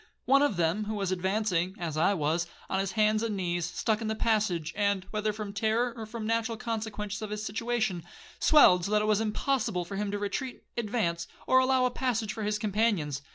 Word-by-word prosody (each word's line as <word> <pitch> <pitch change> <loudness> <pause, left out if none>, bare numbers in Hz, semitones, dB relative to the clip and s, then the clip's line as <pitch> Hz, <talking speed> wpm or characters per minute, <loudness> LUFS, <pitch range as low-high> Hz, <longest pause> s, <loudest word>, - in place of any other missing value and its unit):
One 275 +1 +5
of 285 -10 +2
them, 175 +5 +1
who 215 +1 -3
was 195 -3 -1
advancing, 185 -1 0
as 165 -5 -4
I 170 +6 +3
was, 165 +2 0 0.2
on 190 - +1
his 195 -1 -2
hands 215 0 +3
and 220 -3 -2
knees, 175 -2 -1
stuck 215 +4 -1
in 225 - -2
the 220 - -1
passage, 205 -8 0
and, 200 -2 +1
whether 215 0 0
from 210 -1 -6
terror, 225 +4 +1
or 225 -2 -7
from 230 0 -6
the - - -3
natural 230 0 -1
consequences 215 -2 -4
of 215 - -4
his 210 0 -4
situation, 220 -5 -1 0.4
swelled 180 - +6
so 200 - -3
that 210 0 +3
it - - 0
was 215 0 +3
impossible 215 -4 0
for 195 +3 -6
him 205 0 -1
to 205 - -2
retreat, 245 +6 -4
advance, 205 -8 -1 0.2
or 260 - +5
allow 260 0 +3
a 250 - +1
passage 235 -4 -1
for 220 - -6
his 210 0 0
companions. 205 - 0
210 Hz, 215 wpm, -29 LUFS, 190-225 Hz, 0.4 s, swelled